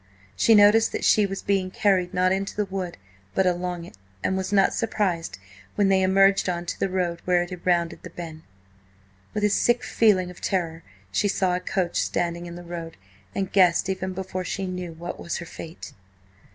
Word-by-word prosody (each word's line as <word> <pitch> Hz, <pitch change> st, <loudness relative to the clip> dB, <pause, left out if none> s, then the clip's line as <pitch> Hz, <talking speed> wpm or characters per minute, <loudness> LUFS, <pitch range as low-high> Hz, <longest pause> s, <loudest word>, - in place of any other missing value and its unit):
She 225 Hz, -, +5 dB
noticed 210 Hz, +2 st, +6 dB
that -, -, -3 dB
she 210 Hz, -2 st, +4 dB
was 195 Hz, 0 st, -5 dB
being 195 Hz, -2 st, +1 dB
carried 185 Hz, -2 st, +1 dB
not 185 Hz, 0 st, +2 dB
into 195 Hz, +1 st, -1 dB
the 210 Hz, -, 0 dB
wood, 190 Hz, -3 st, -5 dB, 0.4 s
but 190 Hz, -, +3 dB
along 180 Hz, -1 st, -1 dB
it, 170 Hz, -, -14 dB, 0.3 s
and 190 Hz, -, +1 dB
was 190 Hz, 0 st, -2 dB
not 195 Hz, -1 st, +4 dB
surprised 185 Hz, -, -1 dB, 0.4 s
when 200 Hz, -1 st, +3 dB
they 190 Hz, -1 st, +4 dB
emerged 195 Hz, +1 st, +4 dB
on 175 Hz, -1 st, -2 dB
to -, -, -5 dB
the 195 Hz, -, 0 dB
road 180 Hz, -2 st, -1 dB
where 180 Hz, -1 st, +3 dB
it 175 Hz, -, -9 dB
had 180 Hz, -1 st, -7 dB
rounded 170 Hz, -2 st, +1 dB
the 180 Hz, -, -9 dB
bend. 165 Hz, -2 st, -8 dB, 0.9 s
With 210 Hz, -, -1 dB
a 210 Hz, -, +4 dB
sick 240 Hz, +4 st, +2 dB
feeling 190 Hz, -5 st, +2 dB
of 180 Hz, -, -14 dB
terror, 165 Hz, -4 st, -1 dB, 0.3 s
she 150 Hz, -, +1 dB
saw 185 Hz, -2 st, +1 dB
a -, -, -1 dB
coach 180 Hz, -1 st, -1 dB
standing 170 Hz, 0 st, -2 dB
in 170 Hz, -, -8 dB
the 175 Hz, -, -9 dB
road, 170 Hz, -1 st, -7 dB, 0.4 s
and 195 Hz, -1 st, -2 dB
guessed, 185 Hz, -1 st, +4 dB
even 190 Hz, 0 st, -2 dB
before 185 Hz, 0 st, -4 dB
she 195 Hz, +2 st, -3 dB
knew, 180 Hz, -2 st, -5 dB
what 170 Hz, +2 st, -7 dB
was 170 Hz, -, -3 dB
her 170 Hz, -, -6 dB
fate. 165 Hz, 0 st, -9 dB
185 Hz, 200 wpm, -25 LUFS, 175-195 Hz, 0.9 s, noticed